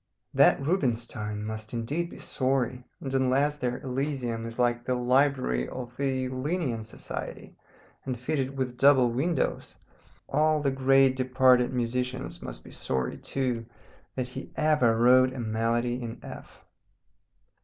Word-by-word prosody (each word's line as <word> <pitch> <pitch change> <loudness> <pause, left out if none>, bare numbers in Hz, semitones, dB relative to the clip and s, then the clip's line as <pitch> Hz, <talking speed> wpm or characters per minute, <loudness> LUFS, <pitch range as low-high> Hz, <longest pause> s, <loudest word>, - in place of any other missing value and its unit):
That - - +5
Rubinstein 120 - -1
must 110 0 -6
indeed 150 +9 -2
be - - -11
sorry, 130 -1 -1 0.2
and 135 -1 -4
unless 135 +3 +2
their 125 0 -1
elysium 130 -4 -2
is 115 - -8
like 120 -1 +1
the 125 +1 0
library 125 - +2
of 125 -1 -7
the 130 -1 -1
Linnæan 130 -3 -2
Society, 110 - -7 0.5
and 130 -3 -4
fitted 135 0 -2
with 125 -2 -2
double 130 -3 +5
windows, 140 +5 -1 0.5
all 155 0 +2
the 140 -2 +1
great 135 0 +4
departed 130 -1 +4
musicians 125 +1 -2
must - - -8
be - - -13
sorry 65 -2 -2
too, 125 -4 -2 0.5
that 125 -1 -2
he 130 +1 -8
ever 150 -7 +3
wrote 130 +2 +5
a - - -5
Melody 115 +2 0
in 115 -1 -5
F. - - -11
130 Hz, 135 wpm, -28 LUFS, 120-135 Hz, 0.5 s, That